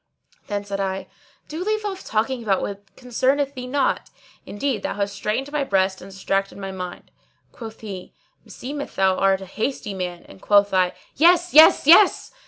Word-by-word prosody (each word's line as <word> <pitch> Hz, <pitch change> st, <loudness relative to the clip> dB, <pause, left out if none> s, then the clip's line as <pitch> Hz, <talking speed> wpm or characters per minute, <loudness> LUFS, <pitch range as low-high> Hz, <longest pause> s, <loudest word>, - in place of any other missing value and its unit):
"[FN#617] -, -, -34 dB
Then 205 Hz, -1 st, -3 dB
said 200 Hz, -1 st, -4 dB
I, 190 Hz, 0 st, -3 dB, 0.4 s
"Do 320 Hz, +3 st, -5 dB
leave 430 Hz, +1 st, -1 dB
off 385 Hz, -2 st, -5 dB
talking 235 Hz, +4 st, -1 dB
about 200 Hz, -4 st, 0 dB
what 200 Hz, 0 st, -6 dB
concerneth 265 Hz, +3 st, 0 dB
thee 250 Hz, -2 st, -7 dB
not: 270 Hz, +1 st, -1 dB, 0.4 s
indeed 225 Hz, 0 st, -2 dB
thou -, -, -3 dB
hast 200 Hz, 0 st, -2 dB
straitened 220 Hz, +7 st, -3 dB
my 295 Hz, -1 st, 0 dB
breast 190 Hz, -5 st, 0 dB
and -, -, -11 dB
distracted 195 Hz, +1 st, -2 dB
my 195 Hz, -1 st, -6 dB
mind." 180 Hz, -1 st, -8 dB, 0.4 s
Quoth 225 Hz, -2 st, -10 dB
he, 195 Hz, -4 st, -8 dB, 0.3 s
"Meseems 285 Hz, +3 st, -7 dB
thou 190 Hz, -1 st, +2 dB
art 195 Hz, 0 st, +2 dB
a -, -, -7 dB
hasty 215 Hz, +2 st, -4 dB
man;" 180 Hz, -2 st, -5 dB
and 95 Hz, -, -15 dB
quoth 205 Hz, -1 st, +3 dB
I, 185 Hz, -1 st, +2 dB, 0.2 s
"Yes! 350 Hz, +3 st, +4 dB
yes! 315 Hz, -1 st, +7 dB
yes!" 350 Hz, +6 st, +5 dB
210 Hz, 180 wpm, -22 LUFS, 195-280 Hz, 0.4 s, yes